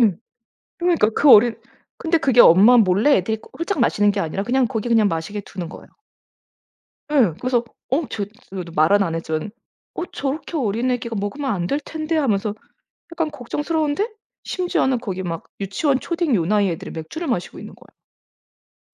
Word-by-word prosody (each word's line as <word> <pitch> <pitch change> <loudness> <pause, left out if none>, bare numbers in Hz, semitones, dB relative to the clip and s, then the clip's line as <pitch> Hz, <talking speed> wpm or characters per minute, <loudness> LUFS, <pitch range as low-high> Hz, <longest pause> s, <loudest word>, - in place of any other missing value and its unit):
음. 210 -7 +3 0.6
그러니까 345 - +2
그 290 - +5
어린 225 +2 +6 0.4
근데 330 0 +1
그게 265 -6 +4
엄마 205 +8 +7
몰래 210 +7 +4
애들이 220 +4 -1
그 - - -17
홀짝 335 -1 -2
마시는 205 -3 +3
게 200 - -2
아니라 165 +3 -2
그냥 255 +3 +2
거기 230 -1 -3
그냥 225 -3 +4
마시게 165 +4 -4
두는 185 -3 -7
거예요. - - -12 1.2
예. 245 - +3
그래서 250 -2 0 0.3
어 285 +4 +1
저 205 - -3 0.3
그래도 180 -3 -6
말은 180 +7 +4
안 170 -4 -2
했지만 160 +3 -3 0.4
'어 - - -3
저렇게 285 +4 -3
어린 240 -1 0
애기가 235 -2 -3
먹으면 260 +8 -3
안 175 -5 -1
될 280 +9 -1
텐데?' 315 +2 -3
하면서 215 -8 0 0.6
약간 325 -2 -2
걱정스러운데 300 - -2 0.4
심지어는 270 -9 0
거기 190 -5 -5
막 165 -2 -4 0.2
유치원, 255 +8 0
초딩 335 -7 -1
요 170 - +1
나이 205 +1 +2
애들이 165 - -5
맥주를 165 - -6
마시고 210 -9 -3
있는 - - -10 1.0
거예요. - - -95
230 Hz, 360 characters per minute, -21 LUFS, 195-290 Hz, 1.2 s, 엄마